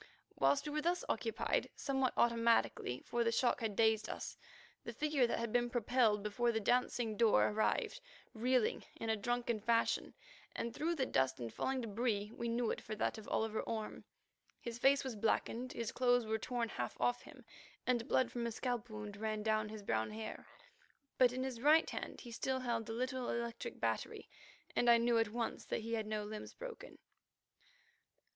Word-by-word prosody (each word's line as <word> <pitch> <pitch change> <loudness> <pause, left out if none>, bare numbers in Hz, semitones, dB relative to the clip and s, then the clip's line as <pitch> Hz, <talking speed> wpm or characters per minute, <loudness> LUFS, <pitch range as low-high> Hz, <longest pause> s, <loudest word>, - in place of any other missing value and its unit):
Whilst 285 - +3
we - - -3
were 305 - 0
thus 350 +3 0
occupied 450 - 0
somewhat 265 -2 0
automatically, 230 - +2
for 240 0 0
the 230 - +2
shock 240 +1 +2
had 220 -3 -1
dazed 220 0 +3
us, - - -5 0.5
the - - -6
figure 295 -5 +2
that - - -1
had 230 -1 -3
been 240 0 +2
propelled 235 -3 +2
before 235 +3 +1
the 220 - 0
dancing 240 0 +1
door 225 0 +5
arrived, 220 - 0 0.3
reeling 245 0 +1
in 225 - -2
a - - +2
drunken 235 +1 -1
fashion, 230 +2 +1 0.4
and 235 - -3
through 330 +6 0
the 270 -4 +1
dust 130 - +1
and 115 -2 -5
falling 260 -1 -1
débris 215 -1 -1
we 235 - -3
knew 235 0 +1
it - - -4
for 215 - -5
that 220 - -1
of 215 - -11
Oliver 220 0 0
Orme. 220 -2 -4 0.6
His 235 -1 -6
face 275 +2 +5
was 260 -4 -4
blackened, 230 +3 0
his 230 -1 -3
clothes 245 -1 +3
were 220 0 -1
torn 235 0 -2
half 120 - -4
off 245 0 +1
him, - - -14 0.4
and 245 -1 +1
blood 255 -4 +2
from 240 -1 -2
a - - -2
scalp 245 0 -2
wound 210 -1 -6
ran 215 0 -2
down 215 -1 +1
his 215 -1 -8
brown 110 - 0
hair. 220 +1 -7 0.7
But 250 -2 +7
in 255 +1 -2
his 255 -3 -4
right 310 +4 +6
hand - - -5
he 240 - -9
still 260 +3 -1
held 235 -3 -1
the 225 - -4
little 255 +1 -2
electric 235 0 -3
battery, - - -2 0.5
and 240 - +3
I 235 - +8
knew 235 0 +3
at 225 -2 +2
once 230 +1 -3
that - - -2
he 230 +1 -4
had 220 -2 -1
no 215 -1 -2
limbs 210 +1 -7
broken. - - -8
235 Hz, 190 wpm, -36 LUFS, 220-250 Hz, 0.7 s, I